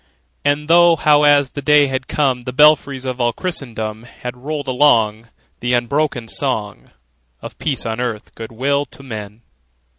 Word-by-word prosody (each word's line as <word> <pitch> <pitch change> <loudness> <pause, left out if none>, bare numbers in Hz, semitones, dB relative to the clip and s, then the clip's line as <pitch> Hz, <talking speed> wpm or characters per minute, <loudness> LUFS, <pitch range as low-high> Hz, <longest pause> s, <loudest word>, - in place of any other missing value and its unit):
And 145 +1 0
thought 170 -1 +5
how, 150 -1 +4
as 145 -2 +4
the 145 - -6
day 150 +1 +4
had 130 -1 -3
come, 135 -4 0
The 125 +1 -6
belfries 140 -1 +3
of 130 -1 -3
all 120 -1 +1
Christendom 115 - -4
Had 125 +1 -8
rolled 145 +3 -5
along 115 -5 +2 0.3
The 120 +1 -1
unbroken 120 0 -1
song 110 -6 -2 0.5
Of - - -11
peace 140 -5 -1
on 110 +1 -3
earth, 115 -4 -5
good 115 0 -9
will 140 +5 0
to 140 - -12
men! 110 -3 -8
130 Hz, 160 wpm, -18 LUFS, 115-145 Hz, 0.5 s, thought